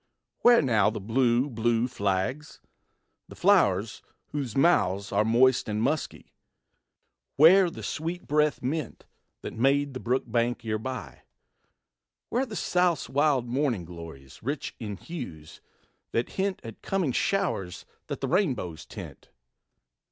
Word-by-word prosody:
Where 240 Hz, -7 st, +6 dB
now 110 Hz, -6 st, +3 dB
the 110 Hz, -, -5 dB
blue, 120 Hz, +4 st, +2 dB
blue 120 Hz, -1 st, 0 dB
flags? 105 Hz, +5 st, -2 dB, 0.7 s
the -, -, -12 dB
flow'rs 115 Hz, -, +2 dB, 0.3 s
whose 135 Hz, -6 st, -3 dB
mouths 100 Hz, -, +2 dB
Are -, -, +3 dB
moist 125 Hz, +2 st, +3 dB
and 105 Hz, 0 st, -1 dB
musky? 145 Hz, +7 st, -2 dB, 1.0 s
Where 175 Hz, +5 st, +7 dB
the -, -, -9 dB
sweet 165 Hz, +3 st, -4 dB
breathed 150 Hz, -1 st, +1 dB
mint, 140 Hz, 0 st, -3 dB, 0.4 s
That -, -, -5 dB
made 140 Hz, +3 st, +1 dB
the 130 Hz, -, -5 dB
brook 125 Hz, +2 st, 0 dB
bank 120 Hz, 0 st, -1 dB
herby? 115 Hz, +4 st, -4 dB, 1.1 s
Where 260 Hz, +3 st, 0 dB
the 215 Hz, -, -7 dB
South's 180 Hz, -6 st, +1 dB
Wild 140 Hz, -2 st, +2 dB
morning 125 Hz, -, -1 dB
glories, 80 Hz, -6 st, -11 dB
rich 140 Hz, +5 st, -4 dB
in 105 Hz, -4 st, -5 dB
hues, 100 Hz, -, -9 dB, 0.5 s
that 115 Hz, -, 0 dB
hint 195 Hz, 0 st, -2 dB
At 115 Hz, -2 st, -10 dB
coming 190 Hz, -8 st, 0 dB
showers 100 Hz, -, -1 dB, 0.2 s
that -, -, -5 dB
the -, -, -1 dB
rainbows 125 Hz, -, -1 dB
tint? -, -, -10 dB
125 Hz, 130 wpm, -27 LUFS, 110-155 Hz, 1.1 s, Where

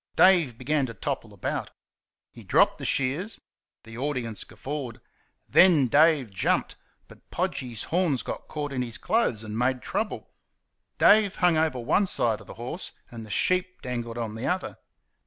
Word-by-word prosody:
Dave 170 Hz, -11 st, +5 dB
began 140 Hz, +2 st, 0 dB
to 115 Hz, -, -8 dB
topple -, -, -4 dB
about. -, -, -4 dB, 0.6 s
He -, -, -13 dB
dropped -, -, +3 dB
the -, -, -5 dB
shears. 145 Hz, -, -1 dB, 0.4 s
The 115 Hz, +1 st, -10 dB
audience 130 Hz, -6 st, -3 dB
guffawed. 130 Hz, -4 st, -6 dB, 0.5 s
Then 160 Hz, -9 st, +5 dB
Dave 145 Hz, -4 st, +4 dB
jumped; 95 Hz, -, 0 dB, 0.3 s
but -, -, -18 dB
Podgy's 120 Hz, -4 st, -3 dB
horns 165 Hz, -7 st, 0 dB
got -, -, -6 dB
caught 145 Hz, -2 st, -4 dB
in 130 Hz, -, -1 dB
his 120 Hz, -2 st, -4 dB
clothes 170 Hz, -, 0 dB
and 110 Hz, -1 st, -6 dB
made 125 Hz, +2 st, 0 dB
trouble. 215 Hz, 0 st, -3 dB, 0.7 s
Dave 205 Hz, -2 st, +5 dB
hung 180 Hz, -3 st, +3 dB
on 160 Hz, 0 st, +2 dB
one 195 Hz, +8 st, +3 dB
side 115 Hz, -10 st, 0 dB
of -, -, -15 dB
the -, -, -10 dB
horse 125 Hz, +10 st, -6 dB, 0.2 s
and 115 Hz, -2 st, -8 dB
the 110 Hz, -, -11 dB
sheep 185 Hz, -, 0 dB
dangled 120 Hz, -2 st, -4 dB
on 115 Hz, -2 st, -3 dB
the 110 Hz, +3 st, -4 dB
other. 185 Hz, +1 st, -2 dB
130 Hz, 160 wpm, -26 LUFS, 115-170 Hz, 0.7 s, Dave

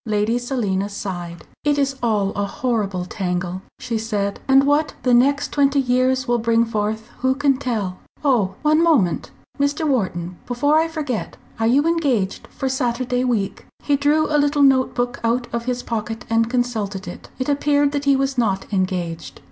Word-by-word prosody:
Lady 215 Hz, +3 st, +1 dB
Selina 210 Hz, -6 st, -1 dB
sighed. 175 Hz, -4 st, -6 dB, 0.2 s
"It 290 Hz, -1 st, +2 dB
is 275 Hz, -1 st, +1 dB
all 210 Hz, -4 st, +1 dB
a 200 Hz, 0 st, -2 dB
horrible 200 Hz, -6 st, -1 dB
tangle," 180 Hz, -1 st, -3 dB, 0.2 s
she 230 Hz, -3 st, -3 dB
said, 205 Hz, -3 st, -2 dB
"and 270 Hz, 0 st, +6 dB
what 290 Hz, +2 st, +2 dB
the 250 Hz, -, +3 dB
next 280 Hz, +4 st, +3 dB
twenty 280 Hz, -1 st, +3 dB
years 255 Hz, 0 st, +1 dB
will 240 Hz, 0 st, +2 dB
bring 230 Hz, 0 st, +2 dB
forth 220 Hz, 0 st, -2 dB
who 260 Hz, +1 st, +2 dB
can 275 Hz, -1 st, +2 dB
tell? 215 Hz, -9 st, -3 dB, 0.3 s
Oh! 215 Hz, -9 st, +2 dB
one 310 Hz, +1 st, +4 dB
moment, 285 Hz, -, +2 dB, 0.3 s
Mr. 285 Hz, +3 st, +1 dB
Wharton, 180 Hz, -, -1 dB
before 285 Hz, +5 st, +2 dB
I 325 Hz, -, +2 dB
forget. 295 Hz, -8 st, -4 dB, 0.2 s
Are 225 Hz, -, +2 dB
you 275 Hz, +6 st, +3 dB
engaged 280 Hz, -, 0 dB
for 270 Hz, -, -4 dB
Saturday 250 Hz, -1 st, 0 dB
week?" 225 Hz, -6 st, -1 dB, 0.2 s
He 290 Hz, -, +2 dB
drew 295 Hz, +2 st, +2 dB
a 300 Hz, -1 st, +1 dB
little 290 Hz, 0 st, +2 dB
note 265 Hz, -2 st, +4 dB
book 245 Hz, +2 st, -1 dB
out 240 Hz, +2 st, +1 dB
of 235 Hz, 0 st, -2 dB
his 250 Hz, -1 st, -2 dB
pocket 225 Hz, +1 st, -4 dB
and 225 Hz, 0 st, +2 dB
consulted 220 Hz, -6 st, -2 dB
it. 175 Hz, -, -9 dB
It 255 Hz, -, -3 dB
appeared 285 Hz, 0 st, +2 dB
that 285 Hz, -1 st, -2 dB
he 280 Hz, -1 st, +5 dB
was 270 Hz, -1 st, 0 dB
not 195 Hz, -5 st, 0 dB
engaged. 180 Hz, -3 st, -2 dB
245 Hz, 175 wpm, -21 LUFS, 205-275 Hz, 0.3 s, and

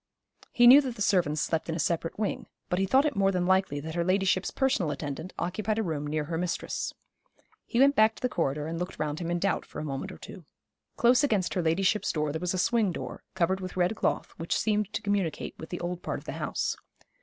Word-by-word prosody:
He 240 Hz, -, +4 dB
knew 260 Hz, +4 st, +10 dB
that 255 Hz, -4 st, -4 dB
the 210 Hz, -, -9 dB
servants 160 Hz, -7 st, +2 dB
slept 160 Hz, +1 st, -1 dB
in 160 Hz, -, -1 dB
a -, -, -3 dB
separate 165 Hz, +1 st, -1 dB
wing; 210 Hz, -1 st, -2 dB, 0.2 s
but 180 Hz, -, 0 dB
he 195 Hz, -, +1 dB
thought 265 Hz, +8 st, +4 dB
it 295 Hz, -, 0 dB
more 195 Hz, -1 st, +3 dB
than 180 Hz, -2 st, 0 dB
likely 190 Hz, -6 st, +2 dB
that 160 Hz, +2 st, -6 dB
her 170 Hz, 0 st, 0 dB
ladyship's 185 Hz, +1 st, +1 dB
personal 255 Hz, -, +1 dB
attendant 150 Hz, +4 st, -5 dB
occupied 210 Hz, +5 st, -2 dB
a 225 Hz, -, +1 dB
room 150 Hz, -5 st, -3 dB
near 150 Hz, +1 st, -1 dB
her 165 Hz, +2 st, -3 dB
mistress. 175 Hz, -1 st, -2 dB, 0.8 s
He -, -, -3 dB
went 280 Hz, +2 st, +6 dB
back 220 Hz, 0 st, +5 dB
to -, -, -14 dB
the -, -, +3 dB
corridor 150 Hz, -, -1 dB
and 165 Hz, +1 st, -4 dB
looked 180 Hz, +1 st, -4 dB
round 150 Hz, 0 st, -2 dB
him 170 Hz, -1 st, -3 dB
in 175 Hz, -, 0 dB
doubt, 195 Hz, +3 st, 0 dB
for -, -, -12 dB
a -, -, -4 dB
moment 145 Hz, +7 st, -4 dB
or -, -, -10 dB
two. 185 Hz, -, -11 dB, 0.5 s
Close 245 Hz, +3 st, +5 dB
against 210 Hz, -10 st, +1 dB
her 180 Hz, -, 0 dB
ladyship's 185 Hz, +5 st, +1 dB
door 150 Hz, -2 st, -1 dB
there 160 Hz, +2 st, -4 dB
was 180 Hz, +1 st, -1 dB
a -, -, -1 dB
swing 220 Hz, +1 st, +2 dB
door, -, -, -6 dB
covered 185 Hz, +2 st, +1 dB
with 185 Hz, -1 st, -7 dB
red 180 Hz, +4 st, +2 dB
cloth, -, -, -1 dB
which 165 Hz, -, -1 dB
seemed 210 Hz, -2 st, 0 dB
to -, -, -3 dB
communicate 200 Hz, -6 st, -1 dB
with 160 Hz, -, -8 dB
the 175 Hz, -, -4 dB
old 175 Hz, 0 st, -3 dB
part -, -, -3 dB
of -, -, -12 dB
the -, -, -4 dB
house. -, -, -1 dB
180 Hz, 245 wpm, -28 LUFS, 165-210 Hz, 0.8 s, knew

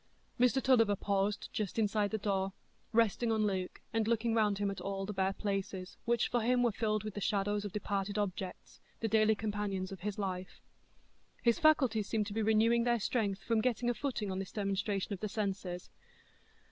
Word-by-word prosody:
Mr 250 Hz, +2 st, +4 dB
Tulliver 230 Hz, -6 st, +5 dB
paused 200 Hz, +1 st, 0 dB
just 210 Hz, -1 st, -2 dB
inside 210 Hz, -1 st, +2 dB
the 220 Hz, -, -1 dB
door, 195 Hz, -2 st, -1 dB, 0.4 s
resting 230 Hz, 0 st, +2 dB
on 215 Hz, -1 st, +2 dB
Luke, 190 Hz, -3 st, -2 dB
and 225 Hz, -1 st, +1 dB
looking 230 Hz, 0 st, +1 dB
round 210 Hz, -3 st, +2 dB
him 200 Hz, 0 st, 0 dB
at 195 Hz, -, -6 dB
all 195 Hz, 0 st, -3 dB
the 210 Hz, -, -4 dB
bare 190 Hz, 0 st, +1 dB
places, 195 Hz, -2 st, -3 dB
which 235 Hz, -1 st, +2 dB
for 240 Hz, -, +1 dB
him 245 Hz, +2 st, +3 dB
were 240 Hz, -, +3 dB
filled 215 Hz, 0 st, 0 dB
with 215 Hz, -1 st, -5 dB
the 205 Hz, -, -5 dB
shadows 205 Hz, +1 st, 0 dB
of 205 Hz, -, -4 dB
departed 200 Hz, 0 st, -2 dB
objects,—the 195 Hz, +2 st, -4 dB
daily 220 Hz, 0 st, +4 dB
companions 205 Hz, -3 st, -2 dB
of 195 Hz, -, -7 dB
his 205 Hz, +3 st, -4 dB
life. 185 Hz, -2 st, -4 dB, 0.8 s
His 235 Hz, -1 st, +3 dB
faculties 260 Hz, -9 st, +4 dB
seemed 220 Hz, -2 st, +1 dB
to 200 Hz, -, -6 dB
be 220 Hz, -, 0 dB
renewing 220 Hz, +2 st, +4 dB
their 240 Hz, -1 st, +2 dB
strength 200 Hz, -3 st, -1 dB
from 225 Hz, 0 st, +2 dB
getting 240 Hz, 0 st, +1 dB
a -, -, -1 dB
footing 235 Hz, -6 st, -2 dB
on 190 Hz, -, -2 dB
this 195 Hz, -, -5 dB
demonstration 200 Hz, 0 st, -1 dB
of 195 Hz, -, -5 dB
the 215 Hz, -, -3 dB
senses. 195 Hz, -4 st, -3 dB
210 Hz, 190 wpm, -33 LUFS, 195-225 Hz, 0.8 s, Tulliver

